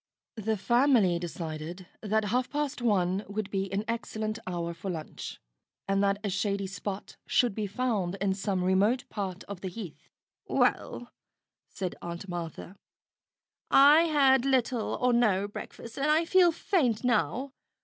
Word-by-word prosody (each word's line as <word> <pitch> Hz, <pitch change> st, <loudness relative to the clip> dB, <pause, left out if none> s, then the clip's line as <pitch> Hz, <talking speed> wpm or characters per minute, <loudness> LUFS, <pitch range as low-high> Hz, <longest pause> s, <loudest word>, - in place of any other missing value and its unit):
The 220 Hz, 0 st, -1 dB
family 235 Hz, -5 st, +3 dB
decided 170 Hz, +1 st, -6 dB, 0.2 s
that 220 Hz, 0 st, +1 dB
half 255 Hz, 0 st, +1 dB
past 295 Hz, -2 st, -2 dB
one 195 Hz, -4 st, +1 dB
would 205 Hz, 0 st, -4 dB
be 195 Hz, -1 st, -2 dB
an 200 Hz, +2 st, -1 dB
excellent 220 Hz, -1 st, -3 dB
hour 170 Hz, -2 st, -3 dB
for 190 Hz, +3 st, -6 dB
lunch, 160 Hz, -4 st, -6 dB, 0.5 s
and 195 Hz, 0 st, +2 dB
that 200 Hz, 0 st, +2 dB
a 205 Hz, -, -1 dB
shady 200 Hz, +1 st, -1 dB
spot 195 Hz, +1 st, -6 dB
should 245 Hz, -4 st, +3 dB
be 210 Hz, 0 st, -2 dB
found 200 Hz, -5 st, -1 dB
in 195 Hz, -1 st, 0 dB
some 190 Hz, -1 st, -1 dB
remote 205 Hz, +8 st, +2 dB
part 195 Hz, -2 st, -4 dB
of 200 Hz, -3 st, -8 dB
the 190 Hz, -, -4 dB
Heath. 185 Hz, -3 st, -8 dB, 0.4 s
"Well," 245 Hz, -, 0 dB, 0.6 s
said 185 Hz, -3 st, -4 dB
Aunt 170 Hz, +3 st, -6 dB
Martha, 175 Hz, +1 st, -6 dB, 0.9 s
"I 295 Hz, +4 st, +7 dB
had 270 Hz, -5 st, +4 dB
little 255 Hz, -4 st, +1 dB
or 250 Hz, 0 st, +2 dB
no 205 Hz, -5 st, +3 dB
breakfast, 225 Hz, +3 st, -9 dB
and 285 Hz, +2 st, +1 dB
I 315 Hz, +2 st, +4 dB
feel 360 Hz, 0 st, +5 dB
faint 280 Hz, -, 0 dB
now. 250 Hz, +2 st, +1 dB
205 Hz, 150 wpm, -29 LUFS, 190-250 Hz, 0.9 s, I